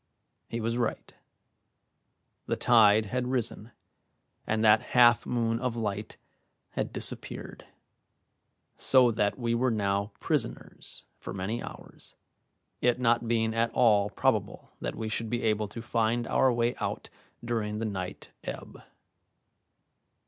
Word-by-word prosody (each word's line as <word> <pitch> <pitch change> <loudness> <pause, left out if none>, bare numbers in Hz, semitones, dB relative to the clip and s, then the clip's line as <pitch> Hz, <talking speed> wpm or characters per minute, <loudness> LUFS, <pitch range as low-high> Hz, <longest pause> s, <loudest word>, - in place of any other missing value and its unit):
He 115 - -3
was 115 +2 -1
right. 120 - -2 1.3
The - - 0
tide 110 -3 +5
had 125 +4 -2
risen, 120 -3 -2 0.8
and 110 0 +1
that 105 0 +6 0.2
half 120 -2 +6
moon 115 -1 0
of 125 -2 -2
light 105 -2 -4 0.5
had - - -3
disappeared, - - -2 1.1
so 130 -2 +5
that 105 -2 0
we 120 -2 -1
were 125 +2 +2
now 100 -2 0
prisoners - - -3
for - - -7
many 100 +5 -3
hours, - - -11 0.7
it 125 0 +2
not 120 -1 +2
being 110 -1 +1
at 115 +1 +1
all 105 -4 +4
probable - - -1
that - - -3
we 110 - -4
should 115 +1 -2
be 120 +1 -2
able 110 -1 +1
to 115 +3 -8
find 115 +1 0
our 130 +3 +3
way 120 0 +1
out - - -4 0.3
during 110 -3 -2
the 115 - -2
night 95 -4 -5
ebb. - - -7
115 Hz, 130 wpm, -29 LUFS, 105-120 Hz, 1.3 s, that